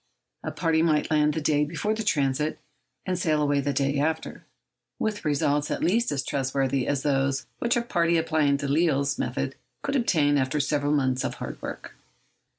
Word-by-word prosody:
A - - -2
party 165 -2 +1
might 155 -2 +1
land 150 -1 +3
the 160 - -1
day 150 0 +2
before 170 +8 -1
the 220 - -3
transit, 150 -6 0 0.5
and 185 -1 -1
sail 155 -3 +1
away 145 -1 +2
the 140 +1 -1
day 140 0 0
after, 160 +2 -2 0.5
with 215 -1 -2
results 145 0 +1
at - - -2
least 215 +7 +2
as 140 -2 -1
trustworthy 135 -1 -1
as 140 -2 0
those 135 -2 +1
which 240 0 +1
a 235 - 0
party 170 -6 +2
applying 155 -3 +2
Delisle's 140 -1 +1
method - - -2 0.3
could 280 - -1
obtain 150 - +3
after 130 +3 0
several 145 0 0
months 130 -3 +1
of - - -3
hard - - -7
work. - - -7
150 Hz, 175 wpm, -26 LUFS, 140-165 Hz, 0.5 s, land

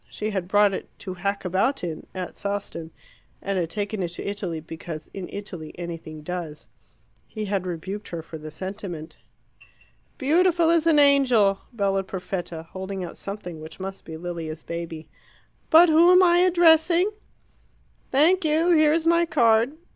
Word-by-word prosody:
She 215 +1 -4
had 190 -3 -3
brought 205 +1 +4
it - - -5
"to 185 - -5
hack 200 +2 -3
about 195 +9 0
in" 165 -3 -5
at 185 -1 -5
Sawston, 200 -5 -4 0.5
and 195 -1 -2
had 165 -2 -2
taken 205 +2 -3
it 175 - 0
to - - -6
Italy 195 -5 -3
because 160 0 -8
"in 190 -2 -6
Italy 180 -6 -7
anything 165 -3 -7
does." 170 -3 -6 0.6
He 215 -1 -5
had 195 -2 -2
rebuked 190 +4 -5
her 170 -2 -6
for 160 0 -9
the 155 0 -8
sentiment. 180 -1 -7 1.0
"Beautiful 335 +3 +3
as 335 -1 +2
an 320 -2 +5
angel!" 255 -9 +4
bellowed 195 -4 0
Perfetta, 175 -3 -5
holding 190 0 -5
out 175 - -7
something 180 -5 -7
which 160 +4 -10
must 195 +1 -6
be 160 - -8
Lilia's 165 -2 -6
baby. 165 -2 -6 0.6
"But 335 +2 +8
who 330 +2 +6
am 365 +1 +7
I 345 -1 +5
addressing?" 345 +1 +4 1.0
"Thank 335 +8 +4
you 320 +3 +2
here 310 -2 +5
is 325 0 0
my 335 0 +4
card." 230 -1 +3
195 Hz, 160 wpm, -24 LUFS, -, 1.0 s, But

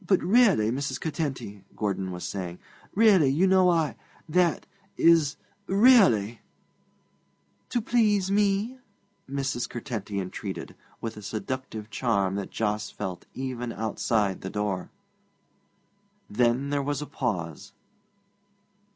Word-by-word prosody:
'But, 185 +1 +3
really, 190 - +4
Mrs. 130 0 -2
Curtenty,' 130 - -4
Gordon 95 -2 -2
was 90 0 -5
saying 90 -3 -5 0.4
'really, 195 -9 +6
you 155 +8 +3
know 185 -1 +5
I 165 -3 +1 0.3
that 170 +1 +2 0.3
is 165 -3 +4 0.3
really 190 - +5 0.6
' - - -42
'To 240 - 0
please 210 -4 +2
me!' 205 +5 +1 0.5
Mrs. 135 -3 -2
Curtenty 110 -5 -4
entreated, 90 -1 -5 0.3
with 110 -1 -5
a - - -8
seductive 110 0 -5
charm 100 -3 +1
that 100 -1 -3
Jos 105 -2 -2
felt 95 -4 -6
even 125 -2 -4
outside 110 -3 -1
the 95 - -5
door. 105 -3 -2 1.4
Then 120 +5 +1
there 145 -1 +1
was 145 +1 -2
a - - -6
pause. 95 - -4
130 Hz, 115 wpm, -27 LUFS, 105-175 Hz, 1.4 s, really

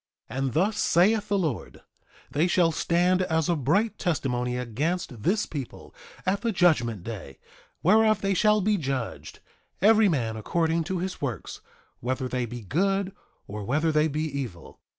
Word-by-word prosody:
3:24 125 - -5
And 135 -3 -1
thus 200 +6 +1
saith 205 +5 +3
the 205 - +1
Lord: 160 - -3 0.5
They 155 +5 +2
shall 175 -2 +3
stand 175 +3 +2
as 160 -3 0
a 175 - +2
bright 200 - +1
testimony 125 -8 -1
against 125 +2 -3
this 200 - +1
people, 140 -5 -7 0.3
at 195 +2 0
the 230 - 0
judgment 125 - +2
day; 100 -11 -7 0.5
whereof 215 +3 +4
they 195 0 +1
shall 210 +3 +3
be 210 +2 +2
judged, 135 -7 -4 0.4
every 215 +1 +5
man 115 -9 -1
according 165 +7 0
to 190 +1 -2
his 185 +2 -4
works, 125 -8 -4 0.4
whether 130 +2 -2
they 125 -1 -2
be 120 +1 -7
good, 195 - 0 0.3
or 105 +1 -6
whether 150 +9 +1
they 155 0 +3
be 155 0 -2
evil. 135 - -6
160 Hz, 160 wpm, -26 LUFS, 125-190 Hz, 0.5 s, every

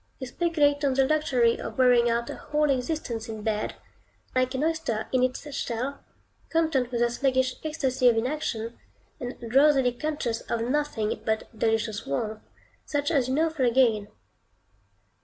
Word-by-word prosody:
You 260 - -6
speculate 290 0 +1
on 270 -2 +2
the 270 0 +4
luxury 260 -6 +2
of - - -6
wearing 245 -2 +5
out 235 0 0
a - - -6
whole 300 -1 0
existence 250 -4 -2
in 220 -1 -6
bed, 215 -1 -1 0.6
like 255 0 +1
an 265 - -1
oyster 315 -9 -1
in 255 - +2
its 255 +3 -1
shell, 255 +4 -3 0.5
content 315 -7 +1
with 240 -2 -2
the 240 0 +3
sluggish 260 0 0
ecstasy 265 -5 +2
of 230 - +2
inaction, 235 -3 -2 0.4
and 245 0 -6
drowsily 265 +2 +4
conscious 250 -3 -3
of 235 - 0
nothing 250 -4 -1
but 220 0 -1
delicious 225 -1 -1
warmth, 215 +10 -2 0.4
such 290 +1 -1
as 275 -6 +2
you 260 - 0
now 325 +2 +2
feel 270 -6 +1
again. 230 -4 +3
255 Hz, 160 wpm, -26 LUFS, 230-290 Hz, 0.6 s, wearing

